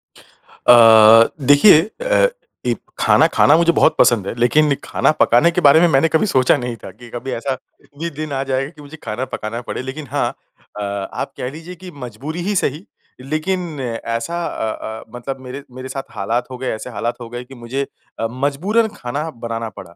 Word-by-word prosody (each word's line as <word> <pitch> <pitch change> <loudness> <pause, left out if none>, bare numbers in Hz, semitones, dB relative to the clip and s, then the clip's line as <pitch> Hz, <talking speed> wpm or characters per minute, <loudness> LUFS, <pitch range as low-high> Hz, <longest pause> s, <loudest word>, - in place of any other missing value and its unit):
अ, - - 0 0.7
देखिए 145 +4 +7 0.2
अ, - - +3 0.4
ई - - +1 0.2
खाना - - +4
खाना 145 - +6
मुझे 170 0 +4
बहुत - - +3
पसंद 105 -5 +4
है। - - -3
लेकिन 140 +5 +3
खाना - - +1
पकाने 120 +9 +4
के 180 - -1
बारे 145 +1 +7
में 175 - +5
मैंने 140 +1 +3
कभी 160 +7 +2
सोचा 130 -8 +3
नहीं 125 -1 -4
था। - - -8
कि 120 +5 -15
कभी 125 +3 -6
ऐसा 130 +2 -2 0.4
भी 170 +1 -2
दिन 155 0 -6
आ 135 0 -1
जाए 135 0 -2
कि 155 -3 -16
मुझे 145 +2 -11
खाना 115 +4 -3
पकाना 115 +3 -4
पड़े। - - -3
लेकिन 135 +3 -7
हाँ 140 -4 0 0.5
अ, - - -3 0.3
आप - - -4
कह 125 - -3
लीजिए 165 +4 -10
कि 180 +1 -11
मजबूरी 140 +9 -6
ही 205 - 0
सही 155 0 -1 0.4
लेकिन 155 +3 -3
ऐसा 115 +6 -3
अ, 110 0 -5
अ, - - -12
मतलब 135 +2 -6
मेरे 130 +2 -8
मेरे 130 +1 -7
साथ 135 +1 -5
हालात 115 +5 -2
हो 130 - -6
गए 130 +1 -5
ऐसे 110 - -8
हालात 120 +1 -4
हो 115 - -8
गए 120 +1 -6
कि 135 +2 -14
मुझे 120 +3 -4 0.4
अ, 115 - 0
मजबूरन 145 - 0
खाना 145 +6 -4 0.2
बनाना 115 -1 -3
पड़ा। 85 -2 -11
135 Hz, 195 wpm, -19 LUFS, 120-155 Hz, 0.7 s, देखिए